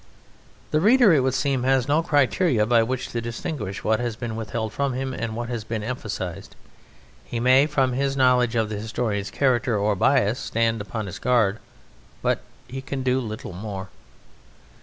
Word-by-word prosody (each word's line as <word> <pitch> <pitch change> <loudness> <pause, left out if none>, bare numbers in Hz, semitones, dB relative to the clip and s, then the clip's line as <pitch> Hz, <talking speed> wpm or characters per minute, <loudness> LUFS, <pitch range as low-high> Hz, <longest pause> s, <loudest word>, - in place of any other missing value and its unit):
The 155 - +3
reader, 230 -1 +6
it 150 - +5
would 130 0 +1
seem, 135 -1 0
has 130 0 +2
no 150 +3 +3
criterion 145 - +2
by 120 -1 +5
which 125 +3 -2
to 120 - -3
distinguish 115 -3 -5
what 110 0 +2
has 120 -2 -2
been 115 -1 -5
withheld 110 0 -4
from 140 +2 -1
him 130 +1 -3
and 115 -3 -4
what 120 +1 -4
has 120 -3 -3
been 110 -1 -4
emphasized; 105 -7 -5 0.7
he 120 - -4
may, 130 +4 +5
from 135 -4 +1
his 135 +1 -1
knowledge 125 -2 +3
of 110 -2 +1
the 105 -1 -4
historian's 110 -2 -2
character 120 -5 +1
or 105 +1 +1
bias, 125 +1 +2
stand 115 -1 0
upon 105 +2 -4
his 100 0 -7
guard, 115 -4 +2 0.6
but - - +1 0.3
he 135 +1 -6
can 135 0 -4
do 130 0 +2
little 110 -6 -6
more. 95 0 -6
120 Hz, 180 wpm, -24 LUFS, 110-130 Hz, 0.7 s, reader